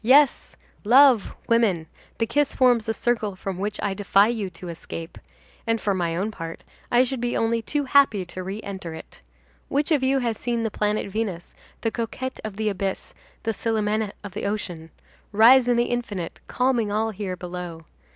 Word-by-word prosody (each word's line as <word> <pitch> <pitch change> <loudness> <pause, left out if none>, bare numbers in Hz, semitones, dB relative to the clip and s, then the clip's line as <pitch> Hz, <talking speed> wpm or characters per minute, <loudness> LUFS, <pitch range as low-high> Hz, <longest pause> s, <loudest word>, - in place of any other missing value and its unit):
Yes, 275 +4 +4 0.3
love, 250 0 +5
woman, 215 -8 +2 0.3
the 230 - +1
kiss 285 +5 0
forms 245 -4 +3
a - - +2
circle 220 -5 0
from 190 -1 -5
which 205 +2 -3
I 200 - 0
defy 200 +1 +3
you 220 -5 -2
to 180 0 -9
escape; 165 0 -8 0.5
and, 225 0 +2
for 205 - 0
my 170 -3 -1
own 200 +5 -1
part, 165 -4 -7 0.3
I 245 +1 +6
should 260 -1 -3
be 245 0 0
only 230 0 +1
too 290 +5 -1
happy 265 -8 +4
to 185 +1 -7
re 195 +4 -5
enter 190 -5 -6
it. - - -12 0.5
Which 290 +3 0
of 295 -4 +4
you 265 +1 +2
has 235 -4 -1
seen 235 -1 -1
the 225 - -1
planet 210 +1 0
Venus, 195 -5 -3 0.3
the 225 - 0
coquette 245 +3 -4
of 215 -2 -5
the 215 +1 -2
abyss, 195 -1 -3 0.3
the 225 - 0
Célimène 215 -1 -1
of 205 - -7
the - - -5
ocean, 180 -6 -4 0.4
rise 240 +4 +7
in 245 -1 +3
the 240 - +4
infinite, 210 -8 -3
calming 250 -4 +1
all 220 +2 0
here 195 -2 -4
below? 175 -2 -7
215 Hz, 185 wpm, -24 LUFS, 190-240 Hz, 0.5 s, rise